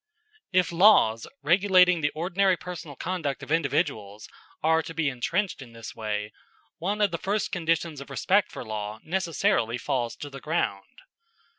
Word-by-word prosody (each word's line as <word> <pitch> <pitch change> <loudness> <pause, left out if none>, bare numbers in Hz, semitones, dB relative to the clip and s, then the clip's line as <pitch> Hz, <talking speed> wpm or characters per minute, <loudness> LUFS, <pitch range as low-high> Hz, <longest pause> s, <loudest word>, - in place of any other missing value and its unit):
If 180 -2 +2
laws 170 - +5 0.2
regulating 180 +1 +5
the 145 - +2
ordinary 185 +3 +2
personal 170 -5 -8
conduct 165 -4 -3
of - - -8
individuals 110 -9 -1 0.4
are 160 +1 +4
to 165 - -9
be 155 -3 +1
entrenched 170 +8 -2
in 120 -3 -11
this 115 -1 -9
way, 105 -1 -3 0.5
one 200 +5 -1
of 205 -2 +3
the 170 - -3
first 205 +2 -1
conditions 165 -4 -1
of 140 - -10
respect 190 +9 +2
for - - -7
law 105 0 -5
necessarily 170 - 0
falls 125 -3 -2
to 145 - -8
the 135 -1 -9
ground. 170 - -2
160 Hz, 155 wpm, -26 LUFS, 125-180 Hz, 0.5 s, laws